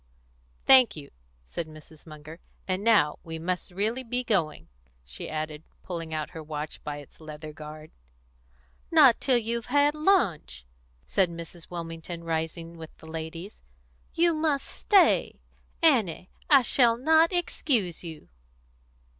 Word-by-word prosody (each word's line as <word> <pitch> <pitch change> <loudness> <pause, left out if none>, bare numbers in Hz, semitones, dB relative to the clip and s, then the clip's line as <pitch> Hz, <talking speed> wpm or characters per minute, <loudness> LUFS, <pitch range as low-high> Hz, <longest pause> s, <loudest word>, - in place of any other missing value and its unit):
"Thank 255 -6 +7
you," 145 -3 -10 0.3
said 160 - -5
Mrs. 155 0 -15
Munger. 155 +1 -11 0.3
"And 185 +1 -1
now 205 -10 +3
we 165 -1 -6
must 180 +2 -3
really 215 +8 -1
be 245 +1 -2
going," 180 -10 0 0.4
she 60 +1 -7
added, 155 -1 -4 0.2
pulling 165 -3 -5
out 155 -1 -3
her 160 - -8
watch 155 0 -6
by 150 -1 -5
its 145 +2 -14
leathern 155 0 -8
guard. 155 +1 -10 1.0
"Not 295 -8 +6
till 260 -3 +3
you've 235 0 -2
had 285 +2 +3
lunch," 230 - +1 0.4
said 190 -2 +2
Mrs. 170 0 -10
Wilmington, 170 0 -7
rising 165 +1 -4
with 160 -1 -11
the - - -15
ladies. 160 +4 -7 0.5
"You 340 0 +3
must 310 -3 0
stay. 395 -3 +3 0.4
Annie, 220 - +2 0.2
I 275 -3 +7
shall 235 -1 +3
not 320 +6 +4
excuse 260 - -1
you." 160 -3 -9
170 Hz, 135 wpm, -27 LUFS, 155-245 Hz, 1.0 s, Thank